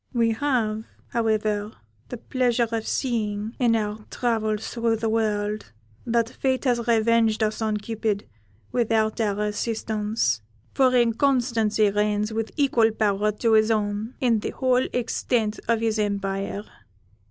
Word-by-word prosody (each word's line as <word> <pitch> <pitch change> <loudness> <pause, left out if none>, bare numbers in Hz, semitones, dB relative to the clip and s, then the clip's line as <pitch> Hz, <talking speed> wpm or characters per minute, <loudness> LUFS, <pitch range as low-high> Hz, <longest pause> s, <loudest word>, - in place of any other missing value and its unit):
We 230 -2 +2
have, 225 -4 0 0.2
however, 215 -2 0 0.4
the 245 - -5
pleasure 245 -1 +1
of 225 -1 -2
seeing, 220 -3 -2
in 235 -3 +3
our 210 0 -2
travels 220 -3 -1
through 230 -1 0
the 225 0 -1
world, 210 - -1 0.4
that 230 -1 +2
fate 260 +1 -1
has 240 -2 +1
revenged 225 -1 +3
us 215 +1 -1
on 215 -1 0
Cupid 215 -1 -2 0.4
without 225 -2 +1
our 210 -1 0
assistance; 210 - -1 0.3
for 255 -1 +3
Inconstancy 235 -3 +2
reigns 210 +1 0
with 225 0 -2
equal 255 -6 +3
power 210 -1 +1
to 225 +2 +1
his 215 0 +5
own 210 +1 -1
in 235 -4 +2
the - - -3
whole 255 -1 +1
extent 225 -2 -1
of 230 -1 +2
his 225 -1 0
empire. 200 -1 -2
220 Hz, 135 wpm, -24 LUFS, 210-235 Hz, 0.4 s, his